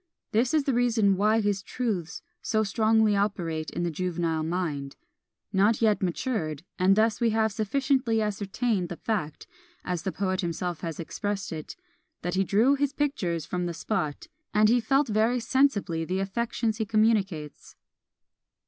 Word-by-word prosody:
This 235 Hz, +3 st, +2 dB
is 305 Hz, -, +3 dB
the 275 Hz, -, 0 dB
reason 230 Hz, -5 st, +3 dB
why 215 Hz, +3 st, +3 dB
his 205 Hz, -2 st, 0 dB
truths 195 Hz, -, -3 dB, 0.2 s
so 220 Hz, -1 st, +1 dB
strongly 220 Hz, 0 st, +3 dB
operate 175 Hz, -6 st, -1 dB
on 175 Hz, -, 0 dB
the 170 Hz, -, -1 dB
juvenile 170 Hz, -1 st, -1 dB
mind, 155 Hz, -5 st, -3 dB, 0.6 s
not 205 Hz, +3 st, +3 dB
yet 215 Hz, -2 st, +3 dB
matured: 170 Hz, -, -2 dB, 0.2 s
and 190 Hz, +2 st, +5 dB
thus 220 Hz, +1 st, +2 dB
we 235 Hz, -, +4 dB
have 220 Hz, 0 st, +2 dB
sufficiently 245 Hz, +2 st, +1 dB
ascertained 205 Hz, -1 st, -1 dB
the 175 Hz, -, -4 dB
fact, 170 Hz, -10 st, -3 dB, 0.4 s
as 180 Hz, -2 st, -2 dB
the 190 Hz, -, -2 dB
poet 185 Hz, 0 st, -1 dB
himself 175 Hz, -1 st, -3 dB
has 165 Hz, -3 st, -5 dB
expressed 205 Hz, +4 st, -3 dB
it, 155 Hz, -2 st, -6 dB, 0.5 s
"that 175 Hz, -, -2 dB
he 190 Hz, +1 st, +2 dB
drew 220 Hz, +8 st, +3 dB
his 285 Hz, 0 st, 0 dB
pictures 185 Hz, -, -1 dB
from 180 Hz, -1 st, -2 dB
the 170 Hz, -, -4 dB
spot, 155 Hz, -7 st, -2 dB, 0.3 s
and 210 Hz, 0 st, +5 dB
he 245 Hz, +2 st, +4 dB
felt 270 Hz, +5 st, +2 dB
very 225 Hz, +3 st, +2 dB
sensibly 230 Hz, -9 st, +1 dB
the 180 Hz, +3 st, -2 dB
affections 225 Hz, +3 st, -1 dB
he -, -, +2 dB
communicates." 200 Hz, -8 st, 0 dB
205 Hz, 155 wpm, -27 LUFS, 175-225 Hz, 0.6 s, and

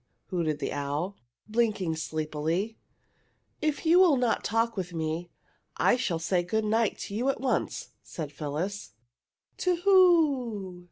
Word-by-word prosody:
hooted 165 Hz, -5 st, 0 dB
the -, -, -3 dB
owl, 145 Hz, +7 st, -2 dB, 0.3 s
blinking 215 Hz, -7 st, 0 dB
sleepily. 160 Hz, +6 st, -2 dB, 0.9 s
"If 305 Hz, +1 st, -1 dB
you 340 Hz, +3 st, +6 dB
will 345 Hz, -7 st, +6 dB
not 245 Hz, -2 st, +1 dB
talk 225 Hz, +1 st, +1 dB
with 180 Hz, -3 st, -4 dB
me 160 Hz, +2 st, -2 dB, 0.5 s
I -, -, +4 dB
shall 200 Hz, -9 st, -1 dB
say 175 Hz, +2 st, +1 dB
good 220 Hz, +5 st, -1 dB
night 220 Hz, 0 st, +1 dB
to -, -, -6 dB
you 240 Hz, +6 st, 0 dB
at 275 Hz, -, -1 dB
once!" 265 Hz, -2 st, -1 dB
said 155 Hz, -4 st, -6 dB
Phyllis. 155 Hz, -, -4 dB, 0.6 s
"To 365 Hz, -1 st, +1 dB
who? 285 Hz, -, +3 dB
200 Hz, 135 wpm, -28 LUFS, 165-245 Hz, 0.9 s, you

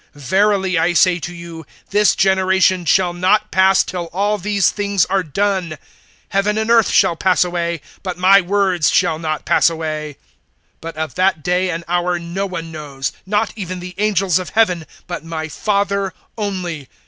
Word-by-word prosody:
(34)Verily 190 Hz, +3 st, +1 dB
I 175 Hz, +2 st, +1 dB
say 175 Hz, +1 st, +3 dB
to 175 Hz, +2 st, -6 dB
you, 170 Hz, -1 st, -9 dB, 0.3 s
this 210 Hz, +1 st, +3 dB
generation 190 Hz, -1 st, +2 dB
shall 180 Hz, +1 st, +2 dB
not 185 Hz, +4 st, +1 dB
pass, 190 Hz, 0 st, +4 dB
till 175 Hz, -1 st, -5 dB
all 200 Hz, +5 st, -1 dB
these 200 Hz, 0 st, +1 dB
things 200 Hz, -3 st, 0 dB
are 195 Hz, 0 st, 0 dB
done. 185 Hz, -1 st, -2 dB, 0.6 s
(35)Heaven 205 Hz, +2 st, +1 dB
and 220 Hz, +1 st, -1 dB
earth 230 Hz, -2 st, +5 dB
shall 170 Hz, -, +3 dB
pass 185 Hz, +2 st, +2 dB
away; 170 Hz, -2 st, -3 dB, 0.2 s
but 185 Hz, -2 st, -5 dB
my 190 Hz, +2 st, +6 dB
words 185 Hz, -3 st, +1 dB
shall 155 Hz, -, +1 dB
not 155 Hz, -2 st, -3 dB
pass -, -, +4 dB
away. 155 Hz, -3 st, -5 dB, 0.6 s
(36)But 165 Hz, 0 st, -6 dB
of 160 Hz, 0 st, -4 dB
that 185 Hz, -4 st, +1 dB
day 180 Hz, +1 st, +1 dB
and 170 Hz, -1 st, -3 dB
hour 175 Hz, 0 st, 0 dB
no 175 Hz, +4 st, -4 dB
one 165 Hz, -3 st, -6 dB
knows, 140 Hz, -4 st, -5 dB, 0.2 s
not 210 Hz, +2 st, 0 dB
even 185 Hz, -3 st, -5 dB
the 180 Hz, +1 st, -8 dB
angels 195 Hz, -4 st, +2 dB
of 185 Hz, -, -6 dB
heaven, 180 Hz, -8 st, +1 dB, 0.2 s
but -, -, -6 dB
my 160 Hz, -1 st, -5 dB
Father 200 Hz, +2 st, -1 dB, 0.2 s
only. 185 Hz, -, -4 dB
185 Hz, 170 wpm, -18 LUFS, 170-195 Hz, 0.6 s, my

